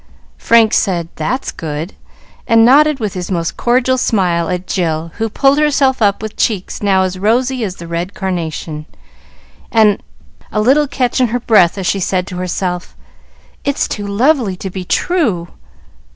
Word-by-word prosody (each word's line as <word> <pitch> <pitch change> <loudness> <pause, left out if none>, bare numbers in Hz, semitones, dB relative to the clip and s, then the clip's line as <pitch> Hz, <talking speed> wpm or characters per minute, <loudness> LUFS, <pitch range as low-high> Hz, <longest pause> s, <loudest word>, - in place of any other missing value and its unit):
Frank 230 -2 +4
said, 175 -5 0
"That's 250 +12 -2
good!" 160 +3 -5 0.5
and 230 0 +5
nodded 290 +3 +5
with 215 -4 -3
his 180 -1 -5
most 170 -3 -2
cordial 255 +1 +1
smile 175 -8 +1
at 180 0 -3
Jill 165 -3 -2
who 225 0 0
pulled 275 +6 +2
herself 275 -4 +2
up 200 0 +2
with 215 - -6
cheeks 200 -5 -2
now 195 -2 +3
as 185 0 -3
rosy 245 +5 +1
as 190 -4 -3
the 170 - -10
red 170 +3 -4
carnation, 160 -4 -4 0.8
and 215 -3 +3 0.5
a 215 - -1
little 275 +7 +3
catch 255 -1 -1
in 250 - +4
her 240 +2 -2
breath 205 -7 +3
as 190 - -4
she 195 - +1
said 185 0 -1
to 180 -1 -7
herself, 180 0 -3 0.7
"It's 280 0 0
too 205 -1 -5
lovely 230 -1 +1
to 190 +1 -6
be 185 0 -5
true." 220 - 0
200 Hz, 165 wpm, -15 LUFS, 180-245 Hz, 0.8 s, and